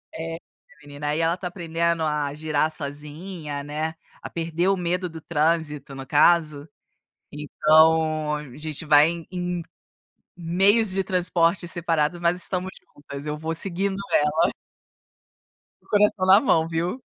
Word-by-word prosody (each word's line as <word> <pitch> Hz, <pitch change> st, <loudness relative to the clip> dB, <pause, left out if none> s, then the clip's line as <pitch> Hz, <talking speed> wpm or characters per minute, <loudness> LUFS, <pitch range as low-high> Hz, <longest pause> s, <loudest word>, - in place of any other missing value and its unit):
É, 165 Hz, 0 st, -5 dB, 0.5 s
menina, 145 Hz, 0 st, -7 dB
aí 150 Hz, +2 st, 0 dB
ela 165 Hz, +1 st, +2 dB
está 180 Hz, +1 st, -5 dB
aprendendo 170 Hz, -2 st, -1 dB
a 150 Hz, -2 st, -1 dB
girar 155 Hz, 0 st, 0 dB
sozinha, 150 Hz, +1 st, -6 dB
né, 155 Hz, +2 st, -4 dB, 0.3 s
a -, -, -7 dB
perder 170 Hz, +1 st, -2 dB
o 195 Hz, 0 st, +2 dB
medo 180 Hz, +1 st, -2 dB
do 165 Hz, 0 st, -9 dB
trânsito, 155 Hz, -3 st, -1 dB
no 135 Hz, 0 st, -7 dB
caso. 150 Hz, 0 st, +2 dB, 0.6 s
Então 155 Hz, +1 st, +2 dB
a 150 Hz, -4 st, -9 dB
gente 155 Hz, +1 st, -4 dB
vai 150 Hz, +1 st, +6 dB
em 170 Hz, -1 st, -6 dB
em 180 Hz, -1 st, -3 dB, 0.7 s
meios 195 Hz, +6 st, +2 dB
de 190 Hz, +1 st, +1 dB
transporte 175 Hz, -1 st, +1 dB
separado 170 Hz, -1 st, 0 dB
mas 170 Hz, 0 st, +2 dB
estamos 185 Hz, 0 st, -3 dB
juntas, 140 Hz, 0 st, -11 dB
eu 150 Hz, 0 st, -3 dB
vou 160 Hz, +1 st, -3 dB
seguindo 190 Hz, +3 st, 0 dB, 0.2 s
ela. 150 Hz, +3 st, +2 dB, 1.3 s
Com -, -, -31 dB
o -, -, -27 dB
coração 210 Hz, -2 st, +2 dB
na 195 Hz, +2 st, +8 dB
mão, 165 Hz, -11 st, +2 dB
viu? 170 Hz, +9 st, -3 dB
165 Hz, 145 wpm, -24 LUFS, 150-175 Hz, 1.3 s, na